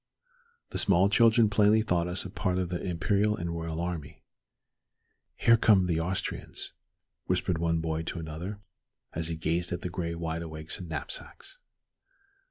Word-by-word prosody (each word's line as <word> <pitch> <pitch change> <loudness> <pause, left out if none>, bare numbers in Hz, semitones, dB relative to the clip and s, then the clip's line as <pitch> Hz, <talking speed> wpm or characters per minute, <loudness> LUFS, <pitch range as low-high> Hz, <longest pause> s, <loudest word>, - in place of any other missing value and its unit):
The - - -1
small 95 0 +5
children 115 +1 +5
plainly 105 +1 +4
thought 90 -5 +1
us 90 +2 -1
a 95 - -6
part 90 -2 -1
of 90 -2 -1
the 90 -1 -3
imperial 100 +4 +1
and 85 -4 -3
royal 80 -1 -4
army. 85 -4 -5 1.1
"Here 115 0 +5
come 100 -5 +5
the 85 -2 +1
Austrians," 90 +3 -3 0.5
whispered 85 -3 0
one 85 -1 +1
boy 80 0 -1
to 85 - -4
another, 85 +6 -6 0.5
as 80 0 -2
he 85 - -2
gazed 85 +2 -1
at 85 - -3
the 90 - -3
gray 85 -1 -3
wide 85 0 -3
awakes 80 -1 -6
and 90 -3 -8
knapsacks. 80 - -7
85 Hz, 160 wpm, -29 LUFS, 80-100 Hz, 1.1 s, small